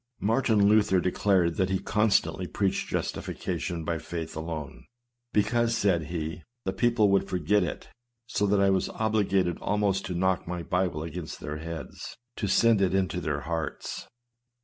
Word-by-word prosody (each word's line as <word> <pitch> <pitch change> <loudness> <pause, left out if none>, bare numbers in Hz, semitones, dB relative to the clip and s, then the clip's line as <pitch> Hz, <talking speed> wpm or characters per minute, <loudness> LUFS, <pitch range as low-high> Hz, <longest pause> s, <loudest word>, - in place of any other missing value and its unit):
Martin 110 -2 +3
Luther 105 -3 +4
declared 90 -2 +2
that 95 0 +1
he 95 - +1
constantly 105 -3 +1
preached 100 0 -1
justification 85 -2 -3
by 80 0 -1
faith 80 0 -6
alone, 80 -3 -6 0.2
" 120 0 -55
because," 115 +2 +2
said 95 -7 +2
he, 80 0 -4 0.2
"the 95 - -1
people 115 -1 +3
would 100 - +2
forget 90 +3 +2
it; 85 - -5 0.4
so 105 -3 0
that 100 0 +3
I 100 0 +4
was 95 - +1
obliged 100 -5 +1
almost 100 -1 0
to 90 - -3
knock 95 0 +1
my 90 -1 -3
Bible 90 -4 -1
against 80 0 -6
their 75 +1 -5
heads, 80 0 -7 0.2
to 105 - -1
send 110 +2 +4
it 95 -1 +2
into 90 -2 0
their 75 -3 -2
hearts." 80 +1 -4
95 Hz, 160 wpm, -28 LUFS, 85-105 Hz, 0.4 s, Luther